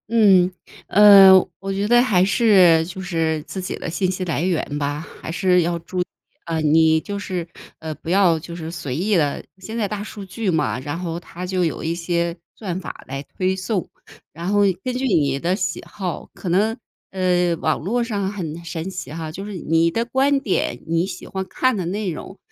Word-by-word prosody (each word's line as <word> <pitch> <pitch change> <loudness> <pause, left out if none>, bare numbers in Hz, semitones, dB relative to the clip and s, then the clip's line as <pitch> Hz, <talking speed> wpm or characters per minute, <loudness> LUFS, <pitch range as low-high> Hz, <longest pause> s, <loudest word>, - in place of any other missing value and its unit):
嗯。 195 -5 +5 0.4
呃， 200 -2 +9 0.3
我 195 0 -4
觉 200 +1 -1
得 240 +2 +6
还 200 -8 +3
是 190 -7 +5
就 190 +2 -7
是 165 -4 -1
自 190 - -6
己 185 - -4
的 - - -5
信 180 +2 0
息 185 0 -3
来 160 -4 -1
源 165 -5 -1
吧， 145 +2 -3 0.2
还 - - -5
是 180 +1 +3
要 170 0 0
注 175 +2 -6
意 - - -1 0.6
你 160 +1 +5
就 200 +5 -5
是， 185 -4 -4 0.3
呃， 160 -1 -5
不 160 - -9
要 180 -3 +4
就 170 +1 -9
是 160 -1 -6
随 155 -6 -5
意 200 +7 +1
的 150 -5 0 0.2
现 220 +5 -7
在 215 -3 0
大 205 0 -4
数 205 -1 -8
据 195 +2 -3
嘛， 160 -6 0
然 145 +5 -4
后 170 -2 -4
它 175 +1 -8
就 185 0 0
有 165 - -2
一 165 +1 -1
些 170 0 -1 0.2
算 185 -5 -4
法 - - -9
来 135 +1 -5
推 185 +5 -2
送， 190 0 -2 0.5
然 170 +2 -6
后 205 0 +3 0.2
根 255 - -2
据 265 - -1
你 145 - +2
的 175 +5 0
喜 - - -2
好， 185 -4 -5
可 185 - -6
能， 210 +6 +2 0.3
呃， 180 -2 +1
网 155 -1 0
络 235 +9 -1
上 205 -4 -2
很 170 -4 -6
神 165 +2 -4
奇 185 -5 -7
哈， 160 -1 -5
就 195 +5 -7
是 210 - -6
你 165 -1 +1
的 230 - 0
观 270 +3 +1
点， 205 -9 -1
你 165 +2 +1
喜 195 - -7
欢 190 -1 -4
看 255 +1 +1
的 185 - -2
内 200 +3 -2
容， 190 +4 -8
180 Hz, 220 characters per minute, -21 LUFS, 165-200 Hz, 0.6 s, 呃